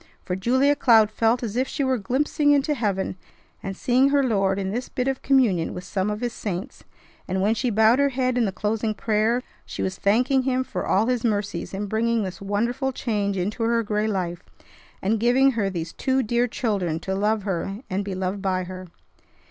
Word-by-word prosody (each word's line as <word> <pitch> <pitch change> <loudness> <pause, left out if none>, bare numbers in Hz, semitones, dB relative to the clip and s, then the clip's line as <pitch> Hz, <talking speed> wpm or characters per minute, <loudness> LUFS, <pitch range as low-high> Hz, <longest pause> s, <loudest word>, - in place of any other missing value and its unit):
For 180 - -3
Julia 260 +9 +2
Cloud 220 -6 +5
felt 230 +3 +1
as 220 -2 -4
if 260 +2 +1
she 280 - -2
were 260 -2 +1
glimpsing 290 +7 +1
into 285 +2 +2
heaven 200 -7 -2 0.4
and 195 -1 -5
seeing 260 +2 +3
her 280 0 +3
Lord 195 -6 +1
in 190 -1 -2
this 245 +4 -4
bit 250 0 -2
of 270 -1 -1
communion 235 -12 +2
with 180 - -6
some 190 +2 -2
of 210 +1 -3
His 240 -1 -2
saints; 200 +3 -5 0.4
and, 190 +1 -1
when 205 +3 +2
she 245 +2 -1
bowed 220 +3 +4
her 280 0 +4
head 255 -1 0
in 245 -2 +2
the 195 - -1
closing 215 +2 -1
prayer, 220 +3 +1 0.2
she - - -5
was 185 0 -3
thanking 250 +6 +3
Him 260 0 0
for - - -5
all 200 +4 +3
His 250 -1 0
mercies 205 -6 -1
in 195 +2 -3
bringing 225 +2 0
this 185 -1 -6
wonderful 235 +7 -1
change 205 -6 -2
into 205 +6 -2
her 230 0 +2
gray 210 0 -1
life, 180 -4 -2 0.6
and 215 +3 +1
giving 255 +4 +4
her 215 -5 -1
these 170 -3 -5
two 265 0 0
dear 240 +2 +1
children 200 -9 -1
to 190 - -3
love 210 +2 0
her 195 0 -2
and 195 -1 -2
be 195 -1 -4
loved 190 +1 -3
by 185 -2 0
her. 185 0 -8
220 Hz, 205 wpm, -24 LUFS, 195-250 Hz, 0.6 s, Cloud